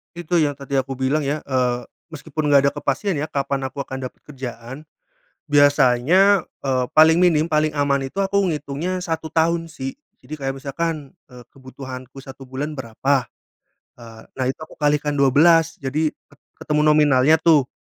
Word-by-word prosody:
Itu 175 0 -1
yang 150 -3 +2
tadi 140 0 -4
aku 135 0 -1
bilang, 135 +3 -1
ya, 150 +2 -2
eee, 125 -2 0 0.3
meski 160 +1 -10
pun 155 0 -2
nggak 140 -1 +4
ada - - -12
kepastian, 165 +6 -1
ya, 145 - -2
kapan 140 -2 -2
aku 130 +2 -5
akan 130 -1 -6
dapat 125 - -10
kerjaan, 130 0 -9 0.7
biasanya, 145 +7 +4 0.2
eee, 130 -2 0
paling 160 +1 +6
minim, 170 -2 +3
paling 155 0 +1
aman 140 -2 0
itu 195 +9 -3
aku 195 +1 0
ngitungnya 160 +3 -3
1 165 -2 -3
tahun, 165 +1 +1
sih. 135 - -7 0.2
Jadi 155 - -8
kayak 135 -1 -3
misalkan, 150 0 -3 0.2
eee, 125 -1 -14
kebutuhanku 130 0 -10
1 135 0 -12
bulan 145 +3 -5
berapa, 130 +3 -1 0.8
eee, 115 -1 -12
nah, 130 - -3
itu 130 - -3
aku - - -17
kalikan 150 0 0
12, 160 +4 +4
jadi 150 +3 -1
ket 140 -1 -26 0.3
ketemu 150 0 +1
nominalnya, 150 0 +4
tuh. 155 -5 +3
145 Hz, 165 wpm, -21 LUFS, 135-155 Hz, 0.8 s, paling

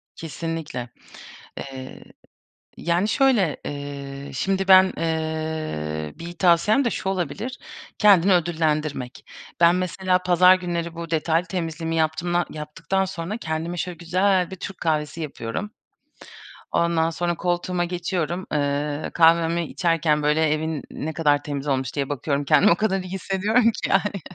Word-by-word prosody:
Kesinlikle. 160 -6 -5 0.7
Eee, 130 -1 -8 0.7
yani 175 +4 +1
şöyle, 230 - +2
eee, 140 -1 -6
şimdi 195 +8 -1
ben, 190 0 +7
eee, 155 - -3
bir 170 +1 -7
tavsiyem 180 +9 +3
de - - +3
şu 190 - -3
olabilir: 195 - -3 0.4
Kendini 200 -3 +6
ödüllendirmek. 155 -6 -1 0.3
Ben 170 +1 +6
mesela 185 +1 0
pazar 180 +1 +6
günleri 170 -2 -3
bu 170 0 -7
detaylı 165 +2 +1
temizliğimi 165 -2 -3
yaptımda 170 +2 0
yaptıktan 155 +5 -2
sonra 185 +3 -5
kendime 165 -2 -3
şöyle 180 0 -4
güzel 185 +2 +1
bir - - -5
Türk 190 +1 -7
kahvesi 155 0 -1
yapıyorum. 150 - -5 1.0
Ondan 170 -1 +2
sonra 175 +1 -1
koltuğuma 175 +1 -1
geçiyorum, 175 0 -2
ııı, 145 +1 -1
kahvemi 170 0 +4
içerken 165 -3 +1
böyle 150 +1 +2
evin 155 -1 -3
ne 160 +2 -4
kadar 150 -3 +2
temiz 145 -1 -4
olmuş 130 -2 -1
diye 140 -2 -1
bakıyorum 145 +1 -1
kendimi 205 +9 +5
o - - +5
kadar 195 0 0
iyi 185 -1 -9
hissediyorum 205 +5 +2
ki, - - 0
yani. 200 0 +1
165 Hz, 135 wpm, -23 LUFS, 150-185 Hz, 1.0 s, ben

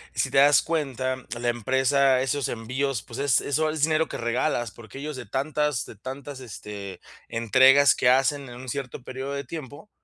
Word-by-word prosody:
Si - - 0
te - - +1
das 145 +1 +7
cuenta, 130 -5 -2 0.2
la 120 0 -1
empresa 130 +3 +2
esos 135 +1 -1
envíos, 125 +2 -2
pues, 120 +2 -9
es 140 -3 +3
eso 155 +2 0
es 155 -1 -3
dinero 160 0 +2
que - - -6
regalas, 120 -1 -1
porque 120 +4 -12
ellos 150 -1 -5
de 125 - -7
tantas 145 +2 -1
de 110 - -12
tantas, 135 +3 -7
este, 100 -5 -8 0.3
entregas 130 +5 +5
que - - +1
hacen 135 +2 +3
en 120 - -10
un 130 +1 -8
cierto 130 -1 -5
período 130 +2 -5
de 140 0 -3
tiempo, 145 - -9
130 Hz, 185 wpm, -25 LUFS, 120-145 Hz, 0.3 s, das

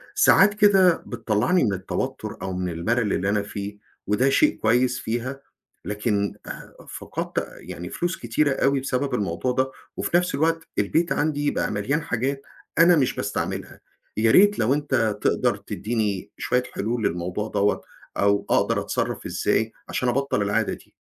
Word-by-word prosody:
ساعات 205 +2 +6
كده 195 -4 +4
بتطلّعني 120 - +1
من 105 -5 +1
التوتُّر 95 0 -4
أو 95 - -3
من 90 0 -2
المَلَل 105 +6 0
اللي 95 - 0
أنا 105 0 +1
فيه 100 0 -6 0.3
وده 105 +7 +3
شيء 300 - +3
كويس 125 +3 +2
فيها، 125 +4 -3 0.4
لكن 105 0 -1
آآ - - -9
فقدت - - -4
يعني 90 +1 -8
فلوس 175 +1 -2
كتيرة 135 +5 +1
أوي 135 +1 +2
بسبب 135 +1 -2
الموضوع 100 +5 -1
ده 130 +1 0 0.3
وفي 175 - +2
نَفْس 180 +1 0
الوقت 160 +2 0
البيت 160 +12 +1
عندي 145 -1 +1
بقى - - -1
مليان 115 +10 -1
حاجات 135 0 -2 0.4
أنا 170 +1 +7
مش 135 -5 +1
باستعملها. - - -4 0.4
يا 110 +1 +4
ريت 205 - +6
لو 115 +5 +3
أنت 125 -8 0
تقدر - - +1
تدّيني 105 -3 -3
شوية 125 0 0
حلول 115 +1 -2
للموضوع 90 +5 -3
دوّة 105 0 +1 0.4
أو 100 0 +2
أقدر - - +2
أتصرّف - - -3
إزاي - - 0 0.2
عشان 125 - 0
أَبطَل 135 -3 0
العادة 100 0 0
دي؟ - - -13
120 Hz, 155 wpm, -24 LUFS, 105-145 Hz, 0.4 s, أنا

